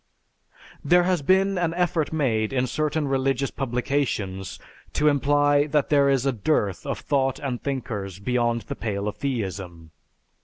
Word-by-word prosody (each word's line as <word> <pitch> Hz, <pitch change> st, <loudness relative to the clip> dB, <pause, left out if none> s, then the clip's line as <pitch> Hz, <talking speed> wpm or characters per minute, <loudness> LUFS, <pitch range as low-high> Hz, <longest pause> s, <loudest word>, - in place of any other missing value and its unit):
There 175 Hz, +4 st, +4 dB
has 180 Hz, -3 st, +1 dB
been 190 Hz, +5 st, +2 dB
an 170 Hz, -1 st, 0 dB
effort 175 Hz, -3 st, 0 dB
made 115 Hz, -9 st, 0 dB
in 130 Hz, -1 st, +1 dB
certain 150 Hz, +3 st, -1 dB
religious 135 Hz, 0 st, 0 dB
publications 120 Hz, -7 st, -2 dB, 0.4 s
to 150 Hz, -, +2 dB
imply 145 Hz, 0 st, +3 dB
that 150 Hz, -1 st, +1 dB
there 140 Hz, -2 st, +4 dB
is 135 Hz, -1 st, +2 dB
a 135 Hz, -, +3 dB
dearth 105 Hz, -, -1 dB
of -, -, -2 dB
thought 135 Hz, -2 st, 0 dB
and 130 Hz, -4 st, -4 dB
thinkers 110 Hz, -9 st, -4 dB
beyond 120 Hz, +2 st, 0 dB
the -, -, -6 dB
pale 105 Hz, -2 st, -3 dB
of 105 Hz, -, -4 dB
theism. 95 Hz, -, -4 dB
135 Hz, 150 wpm, -24 LUFS, 110-145 Hz, 0.4 s, There